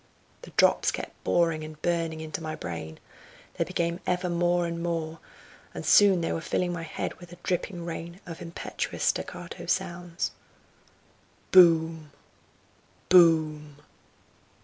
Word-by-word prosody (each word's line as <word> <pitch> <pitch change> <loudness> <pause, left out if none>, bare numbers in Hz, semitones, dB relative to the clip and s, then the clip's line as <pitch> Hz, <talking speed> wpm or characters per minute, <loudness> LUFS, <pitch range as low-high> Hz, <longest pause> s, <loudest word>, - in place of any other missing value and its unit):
The - - -11
drops - - +4
kept - - -6
boring 165 -2 +2
and 155 0 -9
burning 165 -2 -1
into 160 +1 -5
my 155 -1 -4
brain; 80 -2 -6 0.5
they - - 0
became 170 +1 -2
ever 180 0 0
more 175 0 +2
and 170 0 -4
more, 165 -1 -3 0.6
and - - -6
soon 195 -4 +6
they 165 - -1
were 165 - -3
filling 175 +2 -1
my 170 - -4
head 165 - -4
with 175 -1 -13
a 175 - -11
dripping 175 -1 -2
rain 170 +1 -6
of 165 -2 -8
impetuous 170 0 -5
staccato - - -2
sounds. 175 0 -2 1.2
"Boom! 165 -3 +5 1.0
boom! 155 -4 +4
170 Hz, 130 wpm, -27 LUFS, 160-175 Hz, 1.2 s, soon